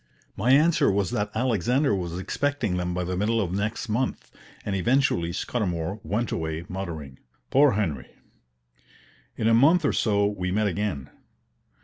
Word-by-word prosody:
My 110 +6 -1
answer 155 +5 +4
was 100 -2 0
that 105 0 -1
Alexander 125 - +1
was 90 -3 -3
expecting 140 +1 -1
them 90 0 -2
by 90 - -1
the 90 +1 -3
middle 110 +5 +1
of 95 -5 -1
next 100 +5 -2
month; 120 +4 -2 0.3
and 100 - -1
eventually 95 -5 +1
Scudamour 95 -2 -2
went 105 +8 -2
away 80 +1 -3
muttering, 80 -8 -6 0.3
"Poor 140 -1 +5
Henry!" 85 - -2 1.3
In 110 - 0
a 115 - +4
month 155 +8 +5
or - - +2
so 100 -2 +2
we 100 -3 -2
met 105 +3 +1
again. 100 -8 -2
100 Hz, 150 wpm, -25 LUFS, 90-120 Hz, 1.3 s, Poor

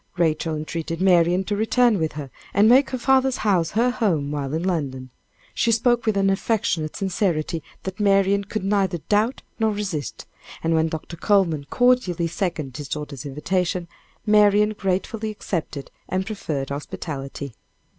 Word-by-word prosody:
Rachel 160 -1 +1
entreated 165 +2 -4
Marian 180 -1 +4
to 205 +2 -2
return 220 0 +3
with 160 -1 -1
her 145 -3 -7 0.2
and 205 +2 +6
make 260 +4 +6
her 255 - -2
father's 265 +1 +2
house 180 -6 +2
her 245 +2 +3
home 175 - 0
while 140 -2 -3
in 165 - -2
London. 135 -8 -2 0.4
She 235 - +1
spoke 235 +1 +2
with 215 -2 +2
an 195 0 +3
affectionate 195 -6 -1
sincerity 175 -4 -1 0.2
that 190 +1 -6
Marian 200 0 +3
could 215 0 -4
neither 195 -3 +1
doubt 215 +5 +1 0.2
nor 220 -1 +2
resist, 195 -9 -4 0.4
and 165 0 +1
when 160 0 +3
Dr. 160 +1 -6
Coleman 170 -7 +2
cordially 245 -9 +2
seconded 165 -6 -3
his 145 -2 -6
daughter's 145 -3 -5
invitation, 175 +4 -1 0.4
Marian 210 0 +5
gratefully 205 +3 -2
accepted 165 -8 -4 0.2
the 185 - 0
proffered 155 -10 -4
hospitality. 140 -1 -6
185 Hz, 150 wpm, -23 LUFS, 155-210 Hz, 0.4 s, and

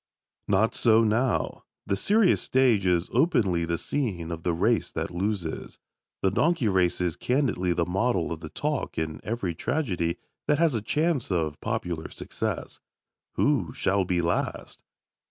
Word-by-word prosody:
Not 105 +3 +2
so 115 0 +5
now. 115 +4 0 0.2
The 100 - 0
serious 205 - +3
stage 120 -7 +3
is 90 -1 +2
openly 115 - +2
the 85 0 -1
scene 90 - -2
of 80 -1 -5
the 85 - 0
race 105 +7 +1
that - - -3
loses. 90 -3 -3 0.5
The 95 - +3
donkey 160 - +2
race 95 -3 +2
is 90 -3 0
candidly 125 -9 0
the 85 0 +1
model 95 -1 0
of 80 - -4
the 80 -1 -8
talk 150 - -3
in 80 -1 -3
every 105 -6 -2
tragedy 90 - -1 0.3
that 150 - +3
has 165 -2 +3
a 110 - -1
chance 150 +4 0
of 80 -5 -1
popular 85 -2 -3
success. - - -5 0.6
Who - - +1
shall 95 0 +1
be 90 -1 0
last? 85 - -2
95 Hz, 155 wpm, -26 LUFS, 85-125 Hz, 0.6 s, so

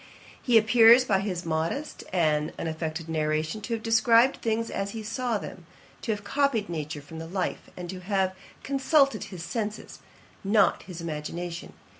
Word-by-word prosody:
'He 240 -3 +4
appears, 230 +2 +7
by 195 -5 +2
his 185 -3 -3
modest 165 - -2
and 155 -4 +1
unaffected 160 0 -4
narration, 155 +4 -1
to 230 - -4
have 220 - -7
described 230 +3 +4
things 230 0 -1
as 195 0 -3
he 220 - -5
saw 230 +1 -1
them, 180 -4 -9 0.3
to - - -2
have 205 -1 -3
copied 240 -3 0
nature 155 -3 -5
from 160 +2 -9
the 165 - -6
life, 185 +2 -3
and 180 -1 -6
to 185 - -7
have 190 0 0 0.3
consulted 275 -3 +2
his 180 -4 -8
senses, 215 0 -4 0.4
not 205 +2 +3
his 180 -3 -9
imagination. 170 +2 -5
195 Hz, 160 wpm, -27 LUFS, 165-225 Hz, 0.4 s, appears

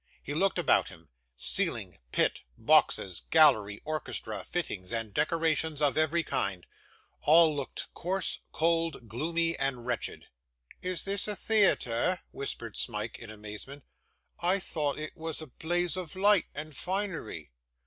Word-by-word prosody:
He 145 - -4
looked 190 +5 +2
about - - +3
him; 80 0 -15 0.3
ceiling, - - -1
pit, - - +2 0.2
boxes, 90 -4 +3
gallery, 110 -11 +5
orchestra, 110 -9 -3
fittings, 105 - -4
and 115 -3 -3
decorations 160 - +1
of 145 -2 +2
every 155 +2 +2
kind, 95 - -2 0.6
all 160 0 +6
looked 140 -2 -4
coarse, 185 +1 -2
cold, 165 -6 0
gloomy, 165 +8 +1
and 135 -3 -1
wretched. 120 -2 -2 0.5
'Is 180 -1 -2
this 200 +1 -1
a 210 - -1
theatre?' 185 - +3
whispered 140 - -4
Smike, - - -1
in 120 - -9
amazement; 110 +6 -9 0.6
'I 180 +3 +3
thought 155 -6 -2
it 155 0 -6
was 160 -1 -4
a 160 - -4
blaze 175 +4 -1
of 180 -4 -5
light 200 -1 +4
and 150 0 -7
finery. 180 - -3
155 Hz, 135 wpm, -30 LUFS, 120-170 Hz, 0.6 s, all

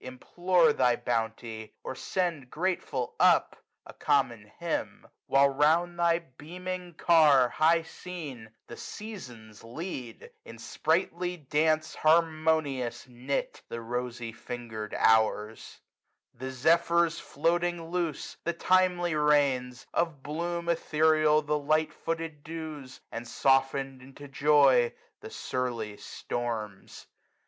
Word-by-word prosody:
Implore 170 +6 +2
thy 125 -3 +3
bounty, 115 -2 -3
or - - -4
send 170 -4 -2
grateful 155 -7 -2
up - - +3 0.2
A - - -11
common - - 0
hymn: - - -3 0.2
while, 140 +1 +5
round 160 +5 +2
thy 170 -1 +4
beaming 175 +4 -8
car, 155 -6 +5
1 125 - +2
20 - - -15
High 165 +2 +4
seen, 155 -9 -8 0.2
the - - -10
Seasons 120 - -9
lead, 125 -1 -7
in 115 - -11
sprightly 175 +7 -1
dance 155 +1 0
Harmonious 155 -6 +1
knit, 125 +3 -4
the 115 - -5
rosy 120 0 -4
finger*d 115 -3 -7
Hours; 110 0 +1 0.5
The 130 +2 -6
Zephyrs 170 +5 +2
floating 170 +2 -1
loose 170 -5 -2
j - - -25
the 170 - 0
timely 180 -1 +2
Rains; 140 -4 +1
Of 160 -5 -1
bloom 170 +3 -3
ethereal 155 -2 +3
the 150 0 0
light 155 +2 +1
footed 165 -3 -5
Dews 155 -4 -7
j - - -30
And 115 +1 -6
soften'd 135 +1 +1
into 135 +2 -12
joy 140 -4 +4 0.3
the - - -9
surly 120 -5 -3
Storms. 110 -5 -5
150 Hz, 120 wpm, -28 LUFS, 125-170 Hz, 0.5 s, while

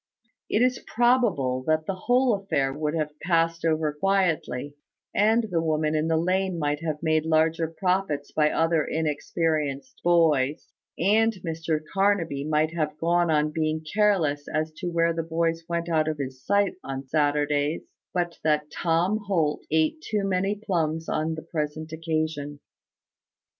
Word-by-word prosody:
It 225 - +3
is 255 0 +1
probable 215 - +2
that 155 0 +2
the 195 - -1
whole 245 +6 +2
affair 140 -10 0
would 150 +2 -2
have 150 -1 -3
passed 165 -1 +1
over 155 -2 +1
quietly, 160 -6 0 0.4
and 220 +3 +3
the 165 -2 +1
woman 155 -1 0
in 155 +1 +1
the 160 0 +2
lane 185 +2 0
might 150 -2 -1
have 155 -1 -3
made 155 -1 +2
large 160 +1 +2 0.2
profits 180 -6 0
by 150 -1 +3
other 165 -1 +2
inexperienced 150 -3 -2
boys, 155 -4 +2 0.3
and 220 +5 +3
Mr 160 -1 -1
Carnaby 195 -8 +1
might 155 +1 +1
have 155 -2 -2
gone 170 +1 +2
on 150 -1 +2
being 155 0 -1
careless 180 -9 +2
as 155 +1 -1
to 180 - -4
where 170 -1 +2
the 165 - -1
boys 165 0 -1
went 170 0 -1
out 160 -2 +1
of 155 -1 -1
his 130 -2 -6
sight 200 +4 +2
on 135 0 -5
Saturdays, 145 +1 +1 0.3
but 175 -1 -2
that 150 -1 +1
Tom 175 +5 +1
Holt 160 -6 +1
ate 160 - +1
too 210 -8 -2
many 195 +1 0
plums 165 -6 -2
on 160 +1 -1
the 160 - -8
present 155 -1 -4
occasion. 155 -2 -3
160 Hz, 155 wpm, -26 LUFS, 150-175 Hz, 0.4 s, It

